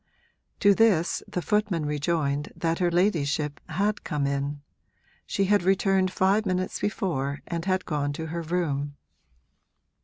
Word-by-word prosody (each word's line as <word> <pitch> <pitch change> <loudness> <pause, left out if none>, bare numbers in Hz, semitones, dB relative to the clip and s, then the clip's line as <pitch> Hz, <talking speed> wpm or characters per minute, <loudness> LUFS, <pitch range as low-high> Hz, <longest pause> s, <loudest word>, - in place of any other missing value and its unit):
To 200 0 +6
this 195 -6 +3
the 180 - -3
footman 205 -7 +1
rejoined 150 -1 -1
that 165 -1 -1
her 175 -1 +3
ladyship 155 -5 +1
had 200 +6 0
come 150 -4 -1
in 140 +1 -2 0.6
she 195 - +1
had 205 +1 +3
returned 190 0 +2
five 195 +3 +2
minutes 185 -2 -1
before 150 - -2
and 170 -1 -4
had 185 -1 0
gone 145 -3 -1
to 160 +2 -5
her 170 - -2
room. 150 -4 -2
170 Hz, 140 wpm, -26 LUFS, 145-190 Hz, 0.6 s, To